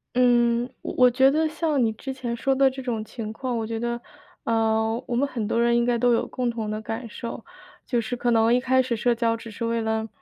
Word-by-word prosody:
嗯， 240 -1 +3
我 - - -5
我 250 -1 +6
觉 265 +2 +5
得 315 +3 +2
像 310 -4 0
你 225 - +2
之 265 +5 -6
前 245 -3 -4
说 270 +3 0
的 270 0 +5
这 265 0 -7
种 230 -4 -3
情 215 -1 -6
况， 250 +1 -3
我 220 -1 -3
觉 225 0 -3
得， 235 0 -2 0.4
呃， 225 +1 +1
我 240 - -2
们 280 +3 +2
很 230 -6 -3
多 230 +2 +1
人 235 0 +3
应 235 - +2
该 240 -1 +2
都 245 +1 +3
有 230 - +1
共 250 -2 -2
同 220 -2 -3
的 215 0 -3
感 225 +2 -5
受， 230 +2 -7 0.4
就 240 -3 0
是 245 +3 -4
可 240 0 0
能 225 +1 +4
一 250 - +4
开 260 +1 +3
始 250 -2 -1
社 240 +2 +2
交 230 0 0
只 225 -1 -10
是 230 +3 -4
为 230 0 0
了， 220 0 -1
235 Hz, 270 characters per minute, -24 LUFS, 225-250 Hz, 0.4 s, 我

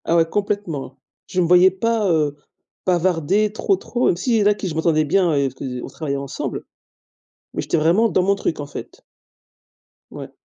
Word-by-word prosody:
Ah 165 - +1
ouais, 165 -1 +4
complètement 200 -6 -2
hein. - - -15 0.3
Je 185 - -2
me - - +2
voyais 180 +2 +7
pas, 215 +1 0
heu, 150 -3 +1 0.5
bavarder 185 +3 +1
trop, 380 - +1
trop, 245 -6 -1
même 170 - +2
s'il 240 +6 -1
y 220 - +3
en - - +1
a - - +6
avec 210 - +1
qui 195 - -3
je 165 - -4
m'entendais 160 -1 +2
bien, 180 +2 +2
heu, 140 -1 +2
parce - - -17
qu'on 125 -3 -6
travaillait 140 -3 -4
ensemble. 140 -1 -5 0.9
Mais - - -2
j'étais 170 - 0
vraiment 175 +9 +3
dans 185 - +1
mon 200 +2 +3
truc, 165 - -2
en 145 - -5
fait. - - -10 1.1
Ouais. - - -9
175 Hz, 205 wpm, -21 LUFS, 155-205 Hz, 1.1 s, voyais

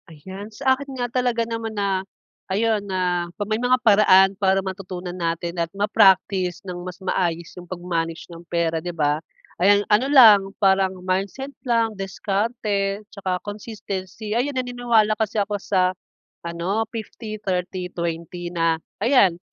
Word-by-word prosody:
Ayan. 190 +7 -9
Sa 265 +4 +2
akin 270 0 -6
nga 245 -1 -1
talaga 245 -2 +1
naman 225 -1 -5
na 195 -2 0 0.5
ayun, 215 +2 +1
na 180 -2 -1 0.2
may 215 +2 -1
mga 250 +1 +3
paraan 195 -2 +6
para 195 -1 +3
matutunan 185 -2 -6
natin 170 0 -2
at 165 - -1
ma-practice 195 -3 +3
nang 180 -1 -6
mas 180 0 -7
maayos 170 -3 -1
yung 180 -1 -11
pag-manage 170 -2 -3
ng 165 - -10
pera, 165 -1 0
'di 175 +2 -4
ba? 150 -1 +1 0.4
Ayan, 205 +2 +5
ano 250 +6 +3
lang, 235 -8 +9 0.2
parang 190 -1 +2
mindset 200 +9 -2
lang, 230 -3 +1
diskarte 200 +1 -2
tsaka 190 -3 -2
consistency. 205 -1 -6
Ayan, 260 +4 0
naniniwala 245 -4 +2
kasi 220 0 -2
ako 205 -1 -1
sa 185 -2 +1 0.5
ano, 170 +5 -2
50-30-20 180 -6 -4
na 165 -1 +1 0.2
ayan 200 -10 +4
195 Hz, 135 wpm, -23 LUFS, 180-220 Hz, 0.5 s, lang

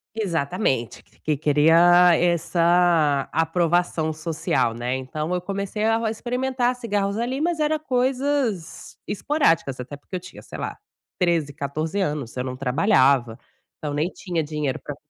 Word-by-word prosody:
Exatamente, 165 - -1 0.2
que 150 -2 0
queria 165 +4 +5
essa 170 -3 +2
aprovação 165 0 +1
social, 155 -6 -1
né, 120 +2 -2
então 150 +5 -4
eu - - 0
comecei 200 +3 -3
a 225 0 +1
experimentar 250 +2 -1
cigarros 205 -5 -1
ali, 250 +3 -2
mas 335 +1 0
era 305 0 +1
coisas 255 - -1
esporádicas 185 - +1
até 125 +3 -7
porque 145 +6 -10
eu - - -2
tinha 185 +1 -12
sei - - -10
lá, - - -4 0.4
13, 165 -5 +1
14 155 +8 -3
anos 150 -10 -2
eu 125 - -2
não 130 0 -5
trabalhava, 130 - +2 0.4
então 150 -2 -4
nem 150 +4 0
tinha 175 -4 -3
dinheiro 150 -3 -3
para 145 - -6
170 Hz, 140 wpm, -23 LUFS, 145-210 Hz, 0.4 s, queria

